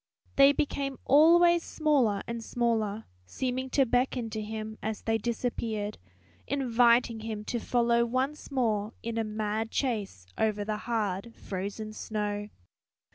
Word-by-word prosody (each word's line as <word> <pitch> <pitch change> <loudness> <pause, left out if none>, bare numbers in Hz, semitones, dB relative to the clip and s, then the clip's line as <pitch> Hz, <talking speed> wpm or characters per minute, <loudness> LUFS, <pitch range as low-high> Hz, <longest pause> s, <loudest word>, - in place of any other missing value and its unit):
They 275 0 +8
became 275 -1 -2
always 340 +4 +6
smaller 275 -12 +1
and 235 -1 -5
smaller, 225 -3 -1 0.2
seeming 260 - -2
to 270 +1 +3
beckon 245 -1 0
to 220 0 -3
him 220 0 -6
as 220 -1 -4
they 225 0 +1
disappeared, 225 -2 -2 0.5
inviting 240 -3 +3
him 215 -1 -5
to 240 - -2
follow 235 0 +2
once 260 +5 -2
more 220 -5 0
in 230 0 -2
a - - +1
mad 215 +1 -2
chase 210 - -2
over 210 -2 +1
the 215 0 -2
hard 215 -1 -2
frozen 205 +3 -5
snow. 210 -1 -3
230 Hz, 130 wpm, -29 LUFS, 215-255 Hz, 0.5 s, They